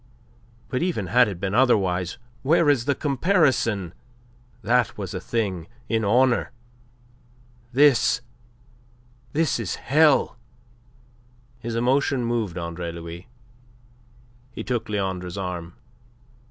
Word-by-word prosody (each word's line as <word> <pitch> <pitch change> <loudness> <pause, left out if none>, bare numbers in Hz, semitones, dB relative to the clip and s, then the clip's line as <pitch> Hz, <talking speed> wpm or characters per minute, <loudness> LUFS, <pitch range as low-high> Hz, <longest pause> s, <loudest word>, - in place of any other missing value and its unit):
But 125 +2 -2
even 170 - -1
had 125 +6 +4
it 95 -4 -5
been 100 0 -2
otherwise 95 -8 +2 0.2
where 160 +2 +4
is 125 -5 0
the 140 - +1
comparison? 135 - +1 0.7
That 120 -1 +1
was 95 -4 -5
a 90 - -3
thing 95 -8 -2 0.2
in 115 -1 +1
honour; 120 +4 +2 1.2
this 135 -2 +4 1.1
this 155 -4 +1
is 105 -7 -3
hell." 150 -2 +3 1.2
His 115 -1 -5
emotion 130 +1 +1
moved 115 -7 -2
Andre 85 0 -4
Louis. 85 +2 -9 1.2
He 125 - -7
took 120 -3 -3
Leandre's 95 -3 -3
arm. 90 -3 -5
115 Hz, 105 wpm, -24 LUFS, 90-130 Hz, 1.2 s, had